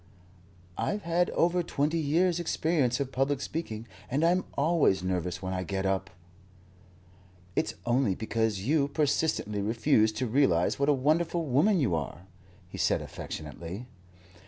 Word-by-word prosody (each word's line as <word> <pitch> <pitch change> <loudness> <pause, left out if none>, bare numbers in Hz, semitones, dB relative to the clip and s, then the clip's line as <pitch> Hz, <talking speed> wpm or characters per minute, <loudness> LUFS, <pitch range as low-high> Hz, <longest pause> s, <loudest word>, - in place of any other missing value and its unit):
"I've 205 0 -1
had 170 +1 +1
over 175 +1 +2
twenty 155 0 0
years' 170 +4 +2
experience 155 -7 +1
of 135 -1 -2
public 135 +1 0
speaking, 115 -8 -5 0.2
and 140 +6 +1
I'm 180 +2 +2
always 140 - +3
nervous 90 0 -2
when 95 0 -2
I 90 - -2
get 95 +1 -3
UP." 95 0 0 1.5
"It's - - 0
only 120 -5 +2
because 110 -2 -1
you 140 +6 +2
persistently 145 -8 0
refuse 110 0 +2
to 130 +4 -2
realize 110 -9 +2
what 140 +1 +2
a - - +7
wonderful 160 +5 +1
woman 160 +9 +3
you 120 - +1
are," 80 +3 -4 0.4
he - - -9
said - - +2
affectionately. 90 +8 -7
135 Hz, 140 wpm, -29 LUFS, 100-160 Hz, 1.5 s, a